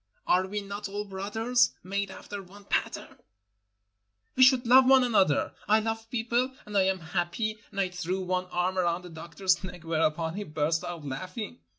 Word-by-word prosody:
Are 185 +1 +3
we 205 +2 -3
not 200 0 -6
all 205 +1 -4
brothers, 210 +5 +1
made 200 +1 -2
after 200 +1 -8
one 195 +2 -15
pattern? - - -2 1.2
We 260 - +1
should 255 -1 +6
love 255 +2 +7
one 265 -1 +7
another. 195 -11 +2
I 215 +2 +5
love 225 0 -3
people, 240 +2 0
and 210 - -8
I 190 -1 +4
am 190 -1 0
happy, 215 +6 -1
and 200 - -6
I 190 -2 +1
threw 180 +1 -3
one 185 0 -1
arm 180 +1 -1
around 175 0 0
the 180 - -9
doctor's 175 +3 -1
neck, 180 -2 -8
whereupon 160 0 0
he 205 +3 -4
burst 155 0 -1
out 170 -4 -6
laughing. 185 - -6
190 Hz, 180 wpm, -28 LUFS, 175-215 Hz, 1.2 s, love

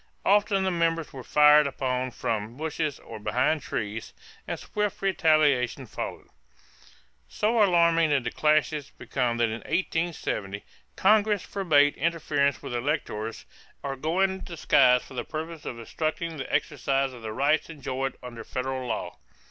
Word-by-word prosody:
Often 200 -1 +3
the 190 - +1
members 165 -2 0
were 130 -2 -8
fired 150 +2 +6
upon 130 -2 -2
from 115 -1 -3
bushes 155 -1 -2
or 110 - -10
behind 125 +8 +1
trees, 110 -2 -5 0.3
and - - -3
swift 210 -1 -2
retaliation 155 -9 +2
followed. - - -6 1.0
So 225 +2 +1
alarming 170 -4 +4
did 140 -4 +2
the 120 - -2
clashes 150 -1 +1
become 120 -1 -2
that 120 -1 +2
in 110 +1 -4
1870 160 - -2 0.3
Congress 210 -1 +3
forbade 150 -7 +3
interference 145 -6 0
with - - -5
electors 120 -4 -3 0.4
or 135 -1 -3
going 170 +8 +1
in 190 0 -7
disguise 130 -7 +3
for - - -13
the 125 - -3
purpose 160 0 -6
of 120 - -5
obstructing 155 +7 -3
the 135 - -6
exercise 135 -1 0
of 120 - -11
the 110 -1 -5
rights 140 +9 +1
enjoyed 135 -4 -4
under 120 -2 -8
federal 130 +1 -3
law. 115 - -4
145 Hz, 145 wpm, -27 LUFS, 125-165 Hz, 1.0 s, fired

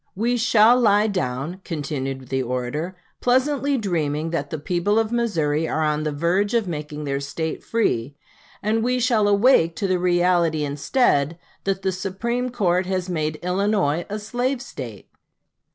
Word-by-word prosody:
We 235 +5 +1
shall 230 0 +5
lie 210 -3 +4
down," 160 -2 -2
continued 135 -4 -4
the 130 0 0
orator, 130 +8 -3 0.2
"pleasantly 275 +2 +2
dreaming 160 - -1
that 170 - -2
the 160 - -3
people 175 +7 0
of 225 0 +1
Missouri 165 -10 0
are 160 - 0
on 150 0 +1
the 155 0 -1
verge 180 +9 +1
of 225 -4 +1
making 150 -2 -5
their 140 -1 -1
State 155 +3 -4
free; 140 - 0 0.5
and 220 +2 +1
we 250 +1 +1
shall 230 -4 +3
awake 200 -5 +4
to 205 - -2
the 185 -2 +1
reality 175 -3 +2
instead, 145 - +1 0.3
that 195 -1 -1
the 190 - +1
Supreme 230 +7 -2
Court 185 -6 +1
has 185 -1 -2
made 155 -2 -1
Illinois 180 -4 +1
a 210 - -3
slave 245 +5 -2
State." 125 - -8
180 Hz, 155 wpm, -23 LUFS, 150-220 Hz, 0.5 s, shall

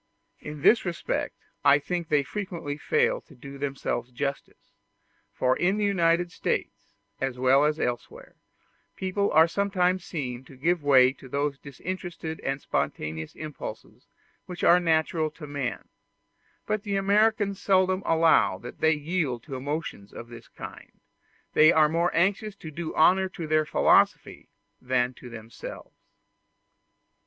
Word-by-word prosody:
In 150 -1 -8
this 230 - +5
respect 175 -2 -3 0.3
I 140 0 +6
think 170 +3 -4
they 145 -2 +3
frequently 175 -4 -5
fail 470 - +1
to 150 - -19
do 140 +2 -11
themselves 135 -3 -3
justice; 140 +2 -5 0.6
for 130 0 +1
in 190 +3 +1
the 210 - +1
United 175 -3 +2
States, - - -4 0.2
as 135 -2 -2
well 130 +3 +4
as 150 +1 0
elsewhere, 120 -1 -4 0.6
people 190 +2 -1
are 160 +2 +6
sometimes 185 -1 0
seen 130 -7 -5
to 130 - -15
give 170 +5 +1
way 130 -3 +5
to 135 -1 -14
those 140 +1 -1
disinterested 165 +2 -6
and 135 +1 -2
spontaneous 80 - -3
impulses 155 -2 -9 0.4
which 180 -1 -7
are 175 - +6
natural 160 -1 +1
to 155 0 -11
man; 140 -3 -4 0.8
but 215 -1 -1
the 200 -1 -3
Americans 200 0 +2
seldom 185 -1 +2
allow 165 - +3
that 120 +6 -10
they 160 0 +4
yield 150 -5 -2
to 140 -4 -7
emotions 140 -6 -5
of 120 - -10
this 120 -1 -12
kind; - - -11 0.5
they 155 +2 +7
are 155 -2 +5
more 170 +3 +1
anxious 195 +4 +1
to 160 -5 -9
do 160 +1 -5
honor 185 +4 +4
to 170 -3 -6
their 155 0 +2
philosophy - - +2 0.3
than 125 0 0
to 125 - -12
themselves. 115 0 -10
155 Hz, 145 wpm, -26 LUFS, 135-180 Hz, 0.8 s, they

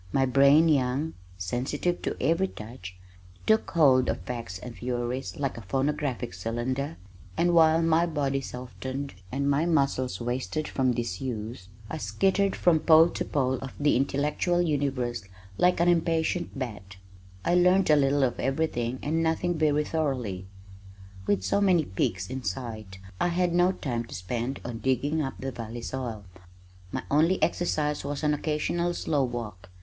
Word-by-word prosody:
My 135 -1 +3
brain 140 +5 +5
young, 140 +1 +1 0.2
sensitive 130 - -2
to - - -3
every 170 +4 +2
touch, 105 - -9 0.5
took 220 0 +3
hold 135 -6 +4
of - - -1
facts 115 -7 -5
and 120 +4 -9
theories 125 +1 -3
like 135 -4 -2
a 100 - -13
phonographic 135 -2 -1
cylinder, 120 +3 -3 0.4
and 175 +1 +3
while 165 0 +5
my 165 +1 +3
body 140 -4 -1
softened 130 +2 -6 0.2
and 140 +1 -1
my 145 +4 +2
muscles 135 - +1
wasted 125 +4 -2
from 130 -2 +1
disuse, 115 -3 -4 0.2
I - - -5
skittered 190 - +1
from 170 -3 +3
pole 160 +1 +6
to - - -3
pole 130 -3 0
of 135 - -7
the 145 0 +3
intellectual 145 +6 +1
universe 135 - 0 0.4
like 180 -1 +4
an 170 - +3
impatient 165 -1 +1
bat. 105 -7 -6 0.5
I 175 - +2
learned 180 0 +4
a - - +7
little 140 0 +3
of 125 -2 0
everything 130 -3 -1
and 160 +3 0
nothing 165 +2 0
very 150 -1 +2
thoroughly. 130 - -2 0.8
With 100 -2 +1
so 95 - +1
many 180 -6 +4
peaks 95 -2 -1
in 130 +1 -5
sight, 110 -2 -5 0.2
I - - +2
had 175 0 +1
no 175 +1 +4
time 120 -9 -3
to - - -9
spend 120 +8 -3
on 120 -2 -5
digging 135 +5 0
up 135 -2 -3
the 135 0 -3
valley 115 -1 -7
soil. 120 -6 -5 0.7
My - - -3
only 165 +6 +3
exercise 150 -4 0
was 145 +1 -4
an 150 0 +3
occasional 165 +4 -1
slow 145 -3 0
walk. 110 -7 -5
135 Hz, 155 wpm, -27 LUFS, 120-160 Hz, 0.8 s, a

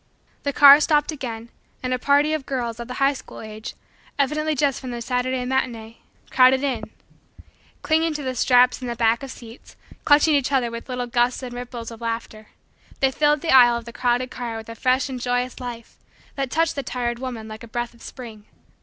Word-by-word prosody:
The 285 - -1
car 285 +1 +9
stopped 300 0 +2
again 235 -5 -6 0.3
and 255 0 -1
a 255 - -1
party 285 +3 +3
of 310 -4 -3
girls 240 -4 -3
of 235 - -6
the 250 - -6
high 275 +2 +2
school 270 - -11
age, 215 0 -8 0.4
evidently 305 +2 0
just 280 -1 0
from 260 - -6
the 240 -1 -5
Saturday 250 +1 -1
matinee, 235 -3 -3 0.3
crowded 260 +1 +5
in. 245 -6 -2 1.0
Clinging 320 0 +1
to 295 - -4
the 260 -1 -2
straps 250 0 +3
and 250 - -4
the 235 - -3
backs 230 +2 +1
of - - -10
seats, 235 -1 -12 0.3
clutching 295 +1 +5
each 280 -2 +1
other 250 -4 +1
with 230 +2 -8
little 250 -1 -2
gusts 240 +2 0
and 245 -1 -6
ripples 245 -1 -7
of 230 0 -11
laughter, 230 -2 -5 0.5
they 270 -1 +3
filled 295 +1 +2
the 330 - +1
aisle 240 -2 +7
of 235 - -8
the 235 - -10
crowded 250 +1 0
car 235 -2 -5
with 225 0 -9
a - - -6
fresh 255 +2 +1
and 255 -2 -6
joyous 245 0 -1
life 240 -2 -8 0.4
that 270 -2 -3
touched 325 +4 +1
the 280 - -2
tired 240 -2 -3
woman 245 -4 -6
like 215 0 -9
a 235 - -10
breath 240 +1 -4
of 235 - -21
spring. 225 -5 -10
250 Hz, 205 wpm, -23 LUFS, 235-275 Hz, 1.0 s, car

